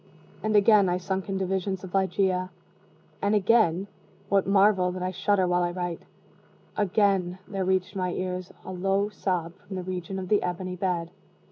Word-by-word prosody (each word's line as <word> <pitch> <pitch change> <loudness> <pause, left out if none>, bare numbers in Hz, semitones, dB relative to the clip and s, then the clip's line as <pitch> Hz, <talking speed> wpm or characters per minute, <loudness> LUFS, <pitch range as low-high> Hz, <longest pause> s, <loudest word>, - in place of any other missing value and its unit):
And 215 0 0
again 205 -2 +6
I 175 - +1
sunk 190 +1 -3
into 190 -1 -1
visions 190 0 -2
of 185 - -9
Ligeia 190 -1 +1 0.7
and 205 +1 +2
again 200 -3 +3 0.4
(what 195 -1 +2
marvel 195 -2 +4
that 185 0 -4
I 185 - -1
shudder 195 +1 +1
while 180 0 +2
I 175 - +1
write?), 175 -1 -4 0.7
again 195 -3 +1
there 195 -2 -2
reached 185 +1 0
my 185 -2 -1
ears 185 0 -4
a - - -6
low 195 +2 0
sob 180 -4 -2
from 195 - -9
the 185 - -4
region 185 +1 -4
of 185 -1 -4
the 210 - +4
ebony 180 +1 -3
bed. 175 -2 -2
185 Hz, 170 wpm, -27 LUFS, 180-195 Hz, 0.7 s, again